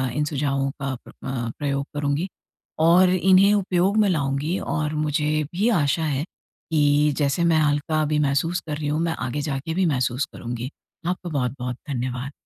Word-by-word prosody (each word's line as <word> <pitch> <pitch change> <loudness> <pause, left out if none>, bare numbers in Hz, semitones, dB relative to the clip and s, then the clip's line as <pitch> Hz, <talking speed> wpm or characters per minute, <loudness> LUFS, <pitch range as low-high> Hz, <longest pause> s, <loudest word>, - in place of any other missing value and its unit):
इन 150 - +1
सुझावों 140 -2 0
का 140 -1 -1
प्र - - -12 0.2
अ, 125 -3 -2
प्रयोग 140 -1 -1
करूँगी 145 +4 -1 0.5
और 175 +3 +6
इन्हें 185 +2 +5
उपयोग 190 0 +1
में 210 -2 +4
लाऊँगी 145 +1 0
और 155 -1 -2
मुझे 150 0 0
भी 205 +7 +2
आशा 160 -6 +2
है 145 -2 0 0.5
कि 150 -1 +3
जैसे 145 +3 +1
मैं 165 -1 +4
हल्का 150 +1 +1
अभी 150 0 +1
महसूस 150 +5 +1
कर 150 -1 -3
रही 150 -1 -3
हूँ 150 +1 0
मैं 165 -1 0
आगे 140 +4 -2
जाके 140 +2 -3
भी 185 +2 +1
महसूस 130 -3 0
करूँगी। 120 +1 -5 0.4
आपका 180 0 -2
बहुत-बहुत 125 -3 -2
धन्यवाद। 125 0 -3
150 Hz, 170 wpm, -23 LUFS, 140-170 Hz, 0.5 s, और